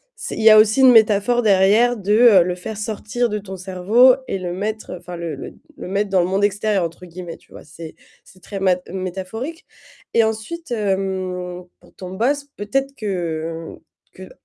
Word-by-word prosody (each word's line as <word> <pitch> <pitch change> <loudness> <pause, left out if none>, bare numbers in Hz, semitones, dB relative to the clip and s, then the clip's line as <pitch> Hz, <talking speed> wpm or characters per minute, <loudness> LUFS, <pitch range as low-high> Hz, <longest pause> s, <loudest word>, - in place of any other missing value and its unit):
c'est 455 - -6
il - - -3
y 220 - +8
a 215 - +8
aussi 215 +4 +4
une 260 -1 +8
métaphore 220 +2 +4
derrière 215 +4 +3
de 210 +1 +5
le 180 +1 -1
faire 205 +4 -7
sortir 220 +3 -2
de 210 - -2
ton 195 -2 -8
cerveau 195 +8 +4
et 195 - -2
le 175 -1 -4
mettre, 215 +1 -4
enfin 175 0 -9
le 165 -3 -5
le - - -9 0.2
le - - -8
mettre 200 +1 -1
dans 190 -2 +3
le 175 - 0
«monde 195 +2 -1
extérieur» 205 -1 0
entre 170 +2 -8
guillemets, 175 -1 -9
tu - - -28
vois? - - -12
C'est 160 +1 -11 0.3
c'est 185 -1 -20
très 195 +1 -7 0.3
métaphorique 190 - -6 0.5
et 230 - +4
ensuite, 220 +9 -4
hem, 190 -4 -3 0.2
pour - - -21
ton 185 -1 -9
boss, 275 +9 -1
peut-être 270 +7 -2
que 165 -5 -4 0.4
qu'un - - -12
200 Hz, 185 wpm, -20 LUFS, 180-220 Hz, 0.5 s, y